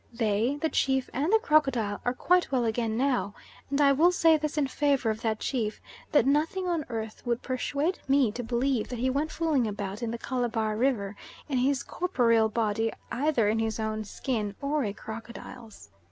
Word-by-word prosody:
They, 230 Hz, +2 st, 0 dB
the 320 Hz, -, 0 dB
chief 265 Hz, -3 st, 0 dB
and 295 Hz, +8 st, 0 dB
the 445 Hz, -, +7 dB
crocodile, 270 Hz, -, +1 dB
are 245 Hz, +1 st, 0 dB
quite 360 Hz, +4 st, +2 dB
well 250 Hz, -3 st, +1 dB
again 225 Hz, 0 st, -1 dB
now, 250 Hz, -5 st, 0 dB, 0.3 s
and 280 Hz, +1 st, 0 dB
I 280 Hz, -1 st, +6 dB
will 320 Hz, +6 st, +5 dB
say 330 Hz, -2 st, +5 dB
this 305 Hz, 0 st, -2 dB
in 295 Hz, -, +3 dB
favour 275 Hz, -4 st, +1 dB
of 220 Hz, +1 st, -5 dB
that 220 Hz, -2 st, -1 dB
chief, 225 Hz, -5 st, -2 dB, 0.3 s
that 295 Hz, -, +4 dB
nothing 315 Hz, +7 st, +1 dB
on 335 Hz, -4 st, -1 dB
earth 220 Hz, -2 st, -5 dB
would 240 Hz, -1 st, -1 dB
persuade 285 Hz, +6 st, -1 dB
me 270 Hz, -4 st, +3 dB
to 245 Hz, -, -5 dB
believe 245 Hz, 0 st, 0 dB
that 245 Hz, -, -4 dB
he 260 Hz, +3 st, +1 dB
went 290 Hz, +4 st, -1 dB
fooling 305 Hz, -8 st, +1 dB
about 205 Hz, 0 st, -5 dB
in 235 Hz, -, -2 dB
the 235 Hz, -, -3 dB
Calabar 230 Hz, -3 st, -1 dB
River 215 Hz, -5 st, 0 dB, 0.3 s
in 270 Hz, -4 st, 0 dB
his 270 Hz, +2 st, +1 dB
corporeal 230 Hz, -11 st, +2 dB
body, 225 Hz, 0 st, 0 dB, 0.2 s
either 250 Hz, -3 st, +1 dB
in 220 Hz, +2 st, +1 dB
his 225 Hz, 0 st, -1 dB
own 215 Hz, 0 st, -2 dB
skin 210 Hz, -2 st, -3 dB
or 285 Hz, +1 st, 0 dB
a 205 Hz, -, -1 dB
crocodile's. 225 Hz, -, -10 dB
245 Hz, 190 wpm, -28 LUFS, 220-285 Hz, 0.3 s, the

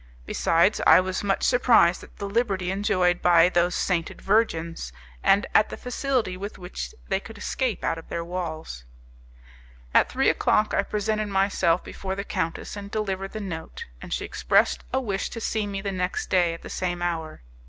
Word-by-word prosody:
Besides, 170 Hz, -, +2 dB
I -, -, +9 dB
was 185 Hz, +1 st, -2 dB
much 195 Hz, -1 st, 0 dB
surprised 235 Hz, -8 st, +4 dB
at -, -, -16 dB
the 200 Hz, -, -4 dB
liberty 200 Hz, -4 st, 0 dB
enjoyed 185 Hz, -3 st, +1 dB
by 175 Hz, 0 st, +6 dB
those 175 Hz, 0 st, +1 dB
sainted 170 Hz, -3 st, -1 dB
virgins, 165 Hz, -, 0 dB, 0.3 s
and 200 Hz, +1 st, +4 dB
at 215 Hz, -, +5 dB
the -, -, -6 dB
facility 250 Hz, -6 st, -1 dB
with 200 Hz, +3 st, -7 dB
which 180 Hz, 0 st, -7 dB
they 190 Hz, -, +1 dB
could 225 Hz, +2 st, -11 dB
escape 245 Hz, +2 st, -2 dB
out 165 Hz, -, 0 dB
of -, -, -15 dB
their 170 Hz, 0 st, -3 dB
walls. 160 Hz, -, -5 dB, 1.1 s
At -, -, +5 dB
three -, -, +1 dB
o'clock 215 Hz, -, +2 dB
I -, -, +3 dB
presented 215 Hz, 0 st, -1 dB
myself 195 Hz, -3 st, +1 dB
before 190 Hz, -1 st, -5 dB
the 200 Hz, -, -4 dB
countess 165 Hz, -2 st, -3 dB
and 200 Hz, -1 st, -7 dB
delivered 195 Hz, -3 st, -3 dB
the 215 Hz, -, -4 dB
note, 165 Hz, -5 st, -6 dB, 0.2 s
and -, -, -9 dB
she -, -, -2 dB
expressed -, -, +2 dB
a 260 Hz, -, +1 dB
wish 205 Hz, -6 st, -2 dB
to 230 Hz, -, -6 dB
see 220 Hz, -1 st, -1 dB
me 195 Hz, -1 st, -4 dB
the 200 Hz, 0 st, -3 dB
next 180 Hz, -1 st, -3 dB
day 175 Hz, -3 st, +3 dB
at -, -, -14 dB
the -, -, -8 dB
same 175 Hz, -1 st, -2 dB
hour. 160 Hz, -, -3 dB
190 Hz, 185 wpm, -25 LUFS, 175-210 Hz, 1.1 s, I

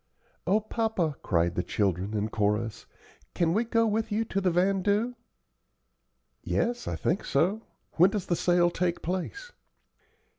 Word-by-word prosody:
"O 205 Hz, +3 st, +4 dB
papa," 215 Hz, -8 st, -1 dB
cried 85 Hz, -2 st, +1 dB
the 90 Hz, -, 0 dB
children, 100 Hz, +1 st, -1 dB
in 105 Hz, +1 st, -1 dB
chorus, 105 Hz, +1 st, -1 dB, 0.5 s
"can 170 Hz, -1 st, +2 dB
we 220 Hz, +5 st, +2 dB
go 230 Hz, -1 st, +2 dB
with 220 Hz, 0 st, -1 dB
you 220 Hz, +2 st, 0 dB
to 195 Hz, -2 st, -2 dB
the 185 Hz, -, +2 dB
vandoo?" 195 Hz, +6 st, +1 dB, 1.3 s
"Yes, 240 Hz, +1 st, -1 dB
I -, -, -2 dB
think 180 Hz, -, -1 dB
so. 180 Hz, +11 st, +1 dB, 0.4 s
When 180 Hz, +3 st, +7 dB
does 200 Hz, -2 st, -3 dB
the 175 Hz, -, 0 dB
sale 175 Hz, +1 st, +3 dB
take 175 Hz, 0 st, -1 dB
place?" 190 Hz, -, -4 dB
180 Hz, 145 wpm, -28 LUFS, 140-215 Hz, 1.3 s, When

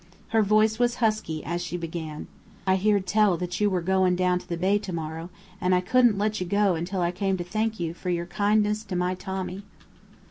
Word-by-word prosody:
Her 225 Hz, 0 st, +3 dB
voice 215 Hz, +2 st, +3 dB
was 240 Hz, -1 st, +2 dB
husky 215 Hz, -9 st, -1 dB
as 175 Hz, +1 st, -2 dB
she 175 Hz, 0 st, -4 dB
began: 160 Hz, -2 st, -5 dB, 0.4 s
"I 190 Hz, -1 st, +3 dB
heerd 200 Hz, 0 st, +2 dB
tell 205 Hz, -2 st, +3 dB
that 180 Hz, 0 st, -4 dB
you 210 Hz, -, +4 dB
were 180 Hz, -3 st, -1 dB
goin' 185 Hz, 0 st, +2 dB
down 180 Hz, 0 st, +2 dB
to -, -, -16 dB
the 170 Hz, -, -2 dB
Bay 195 Hz, +4 st, +2 dB
tomorrow, 165 Hz, -3 st, -5 dB, 0.3 s
and 180 Hz, 0 st, +3 dB
I 180 Hz, -, +2 dB
couldn't 240 Hz, +2 st, +3 dB
let 215 Hz, +1 st, 0 dB
you 180 Hz, -, -2 dB
go 200 Hz, 0 st, +3 dB
until 175 Hz, +3 st, -2 dB
I 170 Hz, 0 st, +1 dB
came 195 Hz, +1 st, -1 dB
to 175 Hz, -, -3 dB
thank 215 Hz, +4 st, -2 dB
you 165 Hz, -1 st, -2 dB
for 180 Hz, +1 st, -6 dB
your 170 Hz, -1 st, -1 dB
kindness 210 Hz, +3 st, +1 dB
to 190 Hz, -3 st, -5 dB
my 180 Hz, +1 st, 0 dB
Tommy." 190 Hz, 0 st, -5 dB
185 Hz, 215 wpm, -26 LUFS, 175-210 Hz, 0.4 s, you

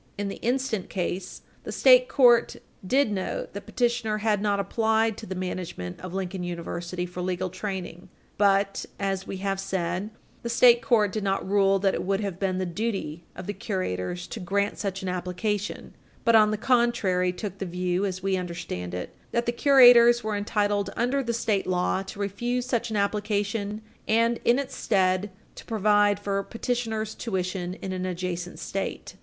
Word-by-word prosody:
In 205 Hz, 0 st, -2 dB
the -, -, -6 dB
instant 245 Hz, -5 st, -1 dB
case, 185 Hz, 0 st, -4 dB, 0.2 s
the -, -, -6 dB
state -, -, +6 dB
court 240 Hz, -4 st, +5 dB, 0.3 s
did 255 Hz, +4 st, +2 dB
note 190 Hz, -2 st, -3 dB
that 200 Hz, -, -8 dB
petitioner 235 Hz, -3 st, 0 dB
had 210 Hz, -1 st, +1 dB
not 205 Hz, -1 st, +1 dB
applied 220 Hz, +1 st, +1 dB
to 220 Hz, -, -8 dB
the 190 Hz, -, -4 dB
management 180 Hz, -, -5 dB
of 185 Hz, 0 st, -7 dB
Lincoln 190 Hz, -1 st, -3 dB
University 175 Hz, +1 st, -4 dB
for 180 Hz, 0 st, -6 dB
legal 185 Hz, 0 st, -2 dB
training. 185 Hz, -2 st, -6 dB, 0.3 s
But, 195 Hz, -1 st, +2 dB
as 195 Hz, -1 st, -2 dB
we 195 Hz, -, -4 dB
have 195 Hz, -1 st, 0 dB
said, 190 Hz, 0 st, -2 dB, 0.3 s
the 235 Hz, -, -4 dB
state 240 Hz, 0 st, +6 dB
court 215 Hz, -6 st, +3 dB
did 215 Hz, +1 st, -3 dB
not 195 Hz, -1 st, -1 dB
rule 195 Hz, 0 st, +3 dB
that 195 Hz, 0 st, +1 dB
it -, -, -2 dB
would 195 Hz, +1 st, 0 dB
have 195 Hz, -4 st, -4 dB
been 190 Hz, -2 st, 0 dB
the 185 Hz, -, -1 dB
duty 175 Hz, -4 st, -3 dB
of 185 Hz, -, -7 dB
the 205 Hz, -, -3 dB
curators 175 Hz, -, -3 dB
to -, -, -6 dB
grant 200 Hz, +2 st, -1 dB
such 195 Hz, -2 st, -3 dB
an -, -, -3 dB
application, 185 Hz, +3 st, -3 dB, 0.3 s
but, 230 Hz, -, +5 dB
on 215 Hz, -1 st, +6 dB
the 215 Hz, -, -1 dB
contrary, 215 Hz, -7 st, +2 dB
took 195 Hz, +1 st, -6 dB
the 195 Hz, -, -2 dB
view, 180 Hz, +1 st, -1 dB
as 190 Hz, -2 st, -3 dB
we 195 Hz, -1 st, +1 dB
understand 170 Hz, -, -5 dB
it, 90 Hz, -, -5 dB, 0.2 s
that 235 Hz, 0 st, 0 dB
the 240 Hz, -, +1 dB
curators 240 Hz, -2 st, +7 dB
were 215 Hz, -1 st, -1 dB
entitled 205 Hz, 0 st, 0 dB
under 250 Hz, +4 st, +1 dB
the 235 Hz, -3 st, -2 dB
state 215 Hz, -4 st, 0 dB
law 180 Hz, +1 st, +1 dB
to 195 Hz, +1 st, -9 dB
refuse 240 Hz, +5 st, -2 dB
such 240 Hz, -2 st, -1 dB
an 220 Hz, -, -3 dB
application 205 Hz, +1 st, -1 dB, 0.2 s
and, 230 Hz, +1 st, +2 dB
in 240 Hz, -, +5 dB
its 275 Hz, -1 st, -4 dB
stead, 190 Hz, -1 st, +1 dB, 0.2 s
to -, -, -11 dB
provide 205 Hz, -2 st, +3 dB
for 200 Hz, -1 st, -1 dB
petitioner's 225 Hz, -1 st, -3 dB
tuition 185 Hz, -4 st, -3 dB
in 190 Hz, -, -3 dB
an 185 Hz, 0 st, -3 dB
adjacent 180 Hz, -1 st, -4 dB
State. 195 Hz, 0 st, -4 dB
200 Hz, 180 wpm, -26 LUFS, 185-225 Hz, 0.3 s, curators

